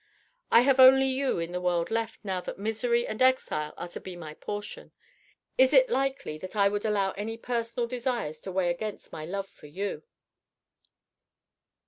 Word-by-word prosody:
I 235 - +8
have 270 +1 +3
only 265 +1 +8
you 265 +1 0
in 165 0 -3
the 180 0 -3
world 175 0 0
left, 225 -1 -3
now 190 -2 -2
that - - -7
misery 230 +3 0
and 215 - -5
exile 255 -12 +2
are - - -5
to - - -6
be 185 -1 -8
my 160 -3 -8
portion! 205 - -7 0.7
Is 260 +1 +6
it - - +6
likely 270 - -1
that 185 +5 -8
I 200 -1 +4
would 205 +1 -3
allow 200 -3 +1
any 220 +4 -5
personal 235 0 -2
desires 235 - -3
to 190 - -6
weigh 180 -1 +1
against 210 +4 -6
my 155 - -6
love 195 +2 -3
for 150 - -16
you?" 195 +7 -4
210 Hz, 175 wpm, -28 LUFS, 180-250 Hz, 0.7 s, I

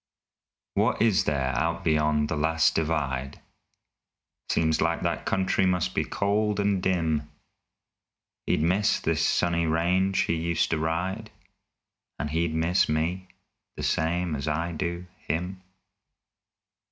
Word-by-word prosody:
What - - +1
is 110 -4 +3
there 65 -3 0
out 85 +3 -1
beyond 75 -1 +2
the 80 - -2
last 80 +2 +2
divide? 70 -5 -2 1.1
Seems 80 -1 +1
like 85 +1 +1
that - - -2
country 95 0 +1
must 90 -2 0
be - - +1
cold 105 +1 0
and 100 -2 +1
dim. 80 -5 0 1.2
He'd - - +1
miss 95 +5 +2
this - - 0
sunny 85 -1 +1
range 90 +4 +2
he - - 0
used 85 0 0
to 80 - +1
ride, 90 +7 -2 0.9
And 75 +2 -3
he'd 80 0 0
miss 85 +3 +2
me, 85 +5 -1 0.5
the - - -5
same 85 0 0
as 70 +1 -4
I 80 +3 -1
do 85 +1 -3
him. 90 +4 -4
85 Hz, 130 wpm, -26 LUFS, 80-90 Hz, 1.2 s, is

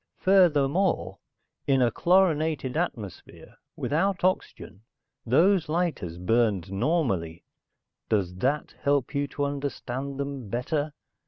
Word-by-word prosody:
Furthermore, 180 -2 +2 0.5
in 135 -2 +3
a 120 -2 +3
chlorinated 160 -6 +2
atmosphere, 115 - -5 0.2
without 185 +5 0
oxygen, 185 - -2 0.5
those 170 - +3
lighters 155 - -2
burned 100 -1 +1
normally. 95 - -1 0.7
Does 95 -5 0
that 140 +9 -1
help 140 -2 +1
you 140 0 0
to 145 0 -2
understand 140 -1 -4
them 140 -5 -4
better?" 145 +6 -2
140 Hz, 100 wpm, -26 LUFS, 115-160 Hz, 0.7 s, in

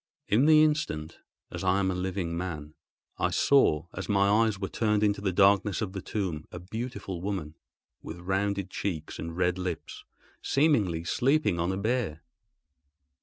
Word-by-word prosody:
In 120 +8 +3
the 155 -1 +7
instant, 85 - -1 0.3
as 90 +1 -5
I 95 +1 +3
am 95 -1 +1
a - - -1
living 90 -2 -3
man, 80 -4 -5 0.5
I - - +2
saw, 80 - +3
as 95 - -6
my 100 -1 +3 0.2
eyes 105 -3 -2
were 95 -1 -3
turned 105 -1 +1
into 100 -1 +1
the 100 -2 0
darkness 100 +1 +3
of 100 -4 -3
the 95 - -5
tomb, 90 -8 -3
a - - -7
beautiful 95 -1 -6
woman, 95 -6 -3 0.5
with 80 - -8
rounded 95 +1 -1
cheeks 80 -6 -4
and 85 +1 -6
red 90 0 +1
lips, 90 -4 -5 0.4
seemingly 110 - +2
sleeping 125 - +1
on 85 +2 0
a 95 - -2
bier. 100 -7 -1
95 Hz, 165 wpm, -28 LUFS, 85-105 Hz, 0.5 s, the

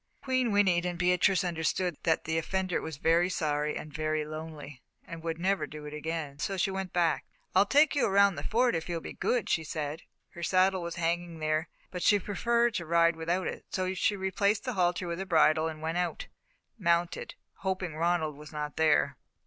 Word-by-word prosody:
Queen 255 -3 +1
whinnied 190 -4 +3
and 180 -1 -2
Beatrice 180 +2 +3
understood 175 0 -1
that 160 -2 +1
the 160 0 0
offender 185 +2 -1
was 160 -4 -6
very 170 +4 +3
sorry 150 -4 -1
and 150 - -8
very 155 0 -1
lonely, 155 -3 -8 0.2
and 170 -1 -8
would 165 0 -3
never 190 +3 0
do 150 0 -9
it 150 - -7
again, 150 -2 -4
so 190 +6 -2
she 195 +2 +1
went 190 -1 -4
back. 170 -3 +1 0.3
"I'll 195 +2 +5
take 290 +7 +5
you 280 - +3
around 200 0 +5
the - - -6
Fort 240 +2 +2
if 165 +1 -3
you'll 170 -1 -1
be - - -8
good," 245 -5 0
she 160 - +1
said. 155 0 -4 0.3
Her 170 - -11
saddle 185 +2 +3
was 170 0 -5
hanging 170 0 -1
there, 155 +1 -1 0.2
but 180 - -5
she 205 - +5
preferred 235 +4 +1
to 170 - -3
ride 170 0 +4
without 170 +3 -1
it, - - -4
so 185 0 -1
she 205 +2 +1
replaced 200 +2 0
the 255 -2 -3
halter 180 -2 +1
with 170 +1 -3
a 190 - -3
bridle 160 -2 +4
and 155 -1 -7
went 165 +2 -1
out, 175 -1 -2 0.5
mounted, 170 -2 0 0.2
hoping 185 -3 -2
Ronald 165 -2 0
was 150 +1 -12
not 150 -1 -5
there. 160 -2 +3
170 Hz, 200 wpm, -29 LUFS, 160-190 Hz, 0.5 s, I'll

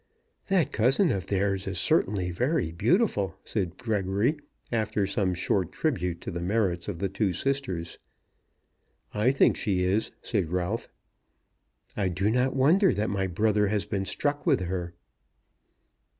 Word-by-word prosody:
"That 190 -7 +2
cousin 135 - +3
of 95 -3 -3
theirs 100 -1 0
is 95 -2 -3
certainly 95 +1 +2
very 125 - 0
beautiful," 100 - +1
said 95 -5 -3
Gregory, 105 - 0 0.4
after 110 -3 0
some 95 -2 0
short 90 0 0
tribute 90 - -1
to - - -5
the 85 - -4
merits 90 -2 0
of 100 -5 -4
the 100 - -1
two 95 0 -1
sisters. 125 -13 -2 1.1
"I 105 +4 +2
think 135 - +4
she 95 -4 0
is," 95 +4 +1
said 95 -8 -1
Ralph. 90 +5 -2 1.1
"I 100 -3 0
do 95 +4 0
not 125 +2 +1
wonder 170 +9 +4
that 105 +1 -1
my 95 -1 0
brother 105 +3 +2
has 105 0 0
been 100 -1 -2
struck 145 +9 -1
with - - +2
her." 90 -1 -4
100 Hz, 145 wpm, -27 LUFS, 90-115 Hz, 1.1 s, think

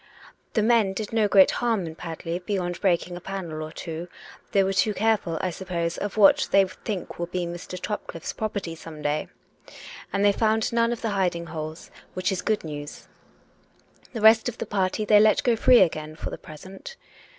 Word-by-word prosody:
The 215 - +2
men 220 -4 +3
did 215 +2 -5
no 220 -2 +3
great 195 -1 +6
harm 225 -6 0
in 160 - -6
Padley 165 +1 -5
beyond 180 -2 -3
breaking 175 -1 +1
a 175 - -8
panel 175 -5 -5
or 155 0 -6
two: 165 +1 -6 0.4
they 195 - +4
were 190 +1 0
too 210 +2 +2
careful, 210 -6 +1
I 185 - -1
suppose, 170 -2 -3
of 205 +1 -4
what 200 -2 +6
they 195 -1 +5
think 185 0 -6
will 170 - -2
be 180 0 -2
Mr. 175 +1 -7
Topcliffe's 170 -5 -5
property 200 -6 -3
some 160 -2 -10
day! 150 +1 -1 0.8
And 200 +1 +1
they 205 - +6
found 220 +2 +1
none 230 0 +2
of 240 - -4
the 225 - 0
hiding 180 -4 0
holes, 155 0 -7 0.2
which 185 +2 0
is 185 -2 -2
good 215 +2 0
news. 145 -2 -8 1.1
The 225 - -4
rest 220 +2 +6
of 240 - -9
the - - -4
party 200 +2 -1
they 210 0 +6
let 215 0 +4
go 240 -2 +3
free 240 +2 +6
again 155 -3 0
for - - -6
the - - -5
present. 190 - -11
190 Hz, 195 wpm, -25 LUFS, 170-215 Hz, 1.1 s, great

